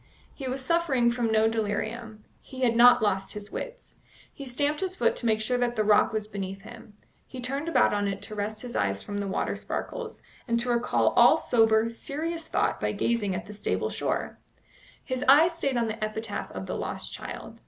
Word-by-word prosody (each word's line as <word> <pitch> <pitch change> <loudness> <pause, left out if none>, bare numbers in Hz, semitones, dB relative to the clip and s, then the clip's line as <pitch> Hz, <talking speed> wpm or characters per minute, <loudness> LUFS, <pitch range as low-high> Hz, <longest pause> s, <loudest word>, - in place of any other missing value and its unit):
He 270 - -6
was 260 +1 -3
suffering 275 -7 +2
from 235 -2 -1
no 220 0 +4
delirium; 220 0 -3 0.2
he 260 -1 -10
had 235 -2 +3
not 240 -1 +7
lost 195 -2 0
his 210 0 -8
wits. - - -7 0.4
He 275 - -9
stamped 290 +4 0
his 375 -1 -2
foot - - +2
to 235 - -1
make 220 -1 +2
sure 245 +3 0
that 240 -1 0
the 215 - +1
rock 210 0 +4
was 215 -1 -2
beneath 195 -2 -6
him; 225 -3 -13 0.3
he 260 - -9
turned 275 +6 -2
about 330 - +3
on 205 0 0
it 200 0 -3
to 215 - -5
rest 215 +2 -4
his 245 - -7
eyes 100 -1 0
from 205 0 -4
the 200 - -2
water 190 - -1
sparkles, 485 -3 -5 0.2
and 235 -1 +1
to 245 +1 -2
recall 240 0 +2
all - - +6
sober, 225 -1 +3
serious 320 +7 -4
thought - - 0
by - - 0
gazing 210 -5 0
at 180 - -5
the 210 - -9
stable 205 - -2
shore. - - -2 0.6
His 255 0 -3
eye 300 +5 +8
stayed 285 -7 -1
on 235 - +1
the 220 0 -4
epitaph 215 0 -3
of 95 0 -6
the - - -4
lost - - -5
child. - - -8
230 Hz, 205 wpm, -27 LUFS, 210-260 Hz, 0.6 s, eye